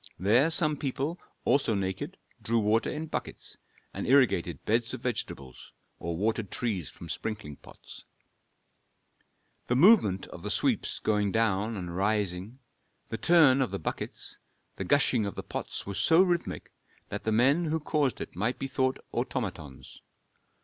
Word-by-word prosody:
There 115 Hz, -, +4 dB
some 155 Hz, -3 st, +4 dB
people, 140 Hz, +5 st, -3 dB, 0.3 s
also 135 Hz, -6 st, +2 dB
naked, 100 Hz, -, -3 dB, 0.2 s
drew 115 Hz, +2 st, 0 dB
water 110 Hz, +1 st, +2 dB
in 155 Hz, +1 st, -4 dB
buckets, 155 Hz, -, -5 dB, 0.4 s
and -, -, -4 dB
irrigated 115 Hz, -, +3 dB
beds 115 Hz, +2 st, +1 dB
of -, -, -10 dB
vegetables, 70 Hz, -, -5 dB, 0.3 s
or 85 Hz, -1 st, -4 dB
watered 110 Hz, +1 st, -1 dB
trees 100 Hz, -10 st, -2 dB
from -, -, -11 dB
sprinkling 75 Hz, -10 st, -5 dB
pots. -, -, -14 dB, 1.6 s
The 125 Hz, -, +1 dB
movement 130 Hz, -, +5 dB
of -, -, -10 dB
the -, -, -4 dB
sweeps -, -, +1 dB
going 105 Hz, -2 st, 0 dB
down 110 Hz, 0 st, +1 dB
and 90 Hz, -2 st, -5 dB
rising, 100 Hz, +2 st, -1 dB, 0.5 s
the 115 Hz, -, -3 dB
turn 145 Hz, -2 st, +5 dB
of 130 Hz, -, +1 dB
the 100 Hz, -, -3 dB
buckets, 80 Hz, -, -5 dB, 0.4 s
the -, -, -4 dB
gushing 130 Hz, -6 st, +3 dB
of 100 Hz, -, -6 dB
the -, -, -5 dB
pots -, -, -5 dB
was 100 Hz, -1 st, -4 dB
so 165 Hz, +3 st, +5 dB
rhythmic 175 Hz, -2 st, -2 dB, 0.4 s
that 105 Hz, -, -5 dB
the 110 Hz, -, 0 dB
men 135 Hz, +10 st, +3 dB
who 160 Hz, +1 st, 0 dB
caused 145 Hz, -5 st, 0 dB
it -, -, -7 dB
might 110 Hz, +7 st, -1 dB
be -, -, -4 dB
thought 130 Hz, 0 st, 0 dB, 0.2 s
automatons. 95 Hz, -, -5 dB
115 Hz, 150 wpm, -29 LUFS, 100-140 Hz, 1.6 s, movement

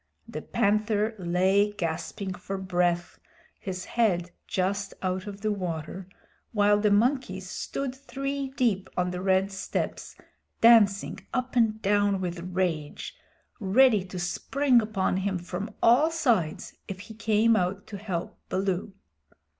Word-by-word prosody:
The -, -, -6 dB
Panther 215 Hz, 0 st, +1 dB
lay 190 Hz, +4 st, +2 dB
gasping 175 Hz, +2 st, -3 dB
for 195 Hz, +2 st, -5 dB
breath, 175 Hz, -2 st, 0 dB, 0.4 s
his 185 Hz, -3 st, -5 dB
head 180 Hz, -7 st, +1 dB, 0.2 s
just 195 Hz, +2 st, -1 dB
out 185 Hz, +2 st, -2 dB
of 200 Hz, -1 st, -7 dB
the 215 Hz, 0 st, 0 dB
water, 180 Hz, -2 st, -4 dB, 0.5 s
while 205 Hz, -1 st, +4 dB
the 210 Hz, 0 st, +3 dB
monkeys 205 Hz, -3 st, +1 dB
stood 265 Hz, +7 st, -4 dB
three 275 Hz, +1 st, -4 dB
deep 205 Hz, -7 st, +1 dB
on 180 Hz, 0 st, +1 dB
the 180 Hz, 0 st, -4 dB
red 190 Hz, +1 st, +2 dB
steps, 190 Hz, -1 st, -4 dB, 0.4 s
dancing 215 Hz, -4 st, +5 dB, 0.2 s
up 255 Hz, 0 st, -2 dB
and 225 Hz, -3 st, +3 dB
down 205 Hz, -1 st, +2 dB
with 175 Hz, -1 st, -3 dB
rage, 175 Hz, -4 st, -3 dB, 0.4 s
ready 220 Hz, +1 st, +4 dB
to 185 Hz, 0 st, -8 dB
spring 250 Hz, +8 st, +2 dB
upon 205 Hz, -4 st, 0 dB
him 190 Hz, 0 st, -1 dB
from 180 Hz, +4 st, -5 dB
all 255 Hz, +7 st, +6 dB
sides 240 Hz, -, 0 dB
if 190 Hz, -1 st, -6 dB
he 210 Hz, +2 st, -10 dB
came 220 Hz, +1 st, +3 dB
out 190 Hz, 0 st, -1 dB
to 215 Hz, -2 st, -7 dB
help 185 Hz, -5 st, -4 dB
Baloo. 190 Hz, +1 st, -1 dB
200 Hz, 135 wpm, -27 LUFS, 185-220 Hz, 0.5 s, all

